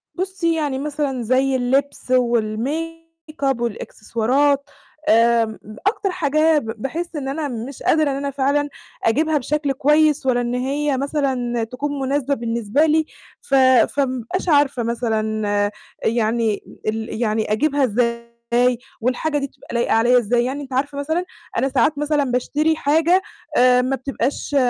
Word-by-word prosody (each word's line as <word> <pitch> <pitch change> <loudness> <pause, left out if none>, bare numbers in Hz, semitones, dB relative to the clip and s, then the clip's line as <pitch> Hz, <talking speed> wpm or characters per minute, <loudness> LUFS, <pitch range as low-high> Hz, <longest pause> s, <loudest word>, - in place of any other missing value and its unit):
بُصي 370 -2 -1
يعني 290 -4 -1
مثلًا 285 -3 -2
زي 260 +3 +2
اللبس 260 +1 -1
والmake 295 +7 -2
up 240 - -10
والإكسسوارات، 245 +5 0 0.4
آمم، 230 -1 +3 0.3
أكتر 405 -2 0
حاجة 310 -2 +2
ب 280 - -10 0.2
باحس 335 +6 -4
إن 280 -3 -4
أنا 295 +2 -2
مش 245 +1 -6
قادرة 310 -2 +3
إن - - -2
أنا 280 0 -3
فعلًا 285 +2 0 0.3
أجيبها 305 +7 +2
بشكل 290 +1 -1
كويّس، 300 +1 +3
ولا 245 -2 +2
إن 240 0 -2
هي 275 +2 -1
مثلًا 260 -4 -1
تكون 280 +5 -4
مناسبة 275 +1 0
بالنسبة 235 +3 0
لي، 315 0 +2 0.4
ف 370 - 0 0.4
فما 265 -2 0
بابقاش 350 +11 -3
عارفة 285 -5 +3
مثلًا 215 -3 -1 0.3
يعني 225 -1 0 0.2
ال 220 +1 -3
يعني 215 -2 0
أجيبها 280 +6 +1
إزاي؟ 235 0 0 0.8
والحاجة 255 +6 0
دي 280 -1 -2
بتبقى - - -14
لايقة 235 - +1
عليَّ 240 +3 +4
إزاي؟ 240 +1 +2
يعني 270 +3 -3
أنتِ 270 -2 -9
عارفة 280 +2 -1
مثلًا، 320 +5 -1 0.3
أنا 270 - +1
ساعات 280 +3 +2
مثلًا 295 0 +1
باشتري 290 +5 0
حاجة 325 +5 +3 0.4
آآ، 250 0 +5
ما 260 +2 0
بتبقاش 270 +2 -3
270 Hz, 145 wpm, -21 LUFS, 235-295 Hz, 0.8 s, آآ